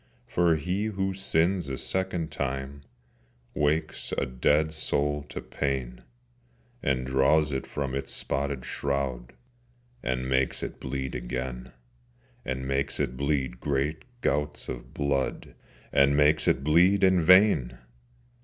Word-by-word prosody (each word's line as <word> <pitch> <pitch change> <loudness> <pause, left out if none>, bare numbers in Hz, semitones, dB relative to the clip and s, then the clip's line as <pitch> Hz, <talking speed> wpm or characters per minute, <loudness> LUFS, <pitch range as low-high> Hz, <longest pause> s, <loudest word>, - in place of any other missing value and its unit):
For 85 -2 +2
he 90 +7 -1
who 95 -2 -1
sins 90 -3 +1
a 65 - -3
second 90 -2 -1
time 70 0 -4 0.7
Wakes 75 +2 0
a - - +1
dead 75 +5 +1
soul 75 -1 0
to - - -6
pain, 65 -3 -3 0.8
And 65 -2 0
draws 70 +4 +3
it 65 -1 -3
from 70 -2 -3
its 70 - -3
spotted 70 -2 -2
shroud, 70 -3 -2 0.7
And 65 0 -2
makes 65 0 +1
it - - -6
bleed 65 0 -4
again, 60 0 -5 0.7
And 65 0 -3
makes 70 0 -1
it 60 - -1
bleed 70 -3 -1
great 70 +2 -1 0.2
gouts 75 -5 -1
of - - -7
blood, 70 -2 -2 0.4
And 70 +1 +4
makes 75 +1 +4
it 65 - +2
bleed 90 +7 +4
in 95 -2 +5
vain! 80 - +5
70 Hz, 125 wpm, -27 LUFS, 65-80 Hz, 0.8 s, in